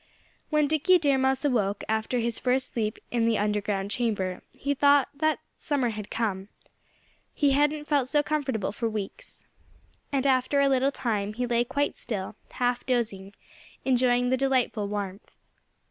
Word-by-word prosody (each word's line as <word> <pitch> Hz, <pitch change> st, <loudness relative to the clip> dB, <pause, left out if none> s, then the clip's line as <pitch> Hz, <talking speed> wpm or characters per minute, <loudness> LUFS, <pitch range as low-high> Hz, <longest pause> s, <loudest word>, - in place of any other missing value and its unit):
When 300 Hz, -2 st, +3 dB
Dickie 315 Hz, +5 st, +4 dB
Deer 285 Hz, -5 st, +2 dB
Mouse 265 Hz, +2 st, +1 dB
awoke, 210 Hz, -7 st, +1 dB
after 220 Hz, +3 st, 0 dB
his 235 Hz, -1 st, -1 dB
first 255 Hz, +1 st, 0 dB
sleep 215 Hz, -2 st, -1 dB
in 230 Hz, -1 st, +1 dB
the 225 Hz, -2 st, +2 dB
underground 205 Hz, -1 st, -1 dB
chamber, 205 Hz, -7 st, -1 dB
he 285 Hz, +1 st, -2 dB
thought 285 Hz, 0 st, +4 dB
that 310 Hz, +2 st, 0 dB, 0.2 s
summer 275 Hz, -5 st, 0 dB
had 210 Hz, -2 st, -6 dB
come. 200 Hz, -4 st, -2 dB, 0.9 s
He 285 Hz, -2 st, +3 dB
hadn't 295 Hz, +2 st, +2 dB
felt 285 Hz, -4 st, +1 dB
so 295 Hz, +2 st, +2 dB
comfortable 270 Hz, -10 st, -1 dB
for 230 Hz, +2 st, -2 dB
weeks. 215 Hz, -, -7 dB, 0.7 s
And 275 Hz, -1 st, 0 dB, 0.2 s
for 280 Hz, +2 st, 0 dB
a 280 Hz, -, +4 dB
little 270 Hz, +1 st, +2 dB
time 210 Hz, -6 st, -2 dB
he 245 Hz, +3 st, -2 dB
lay 240 Hz, 0 st, +2 dB
quite 285 Hz, +4 st, -1 dB
still, 200 Hz, -3 st, -4 dB, 0.2 s
half 245 Hz, -1 st, 0 dB
dozing, 205 Hz, -6 st, -2 dB, 0.5 s
enjoying 250 Hz, -1 st, +3 dB
the 260 Hz, -, +3 dB
delightful 255 Hz, -6 st, +1 dB
warmth. 200 Hz, -1 st, -5 dB
245 Hz, 155 wpm, -27 LUFS, 215-280 Hz, 0.9 s, Dickie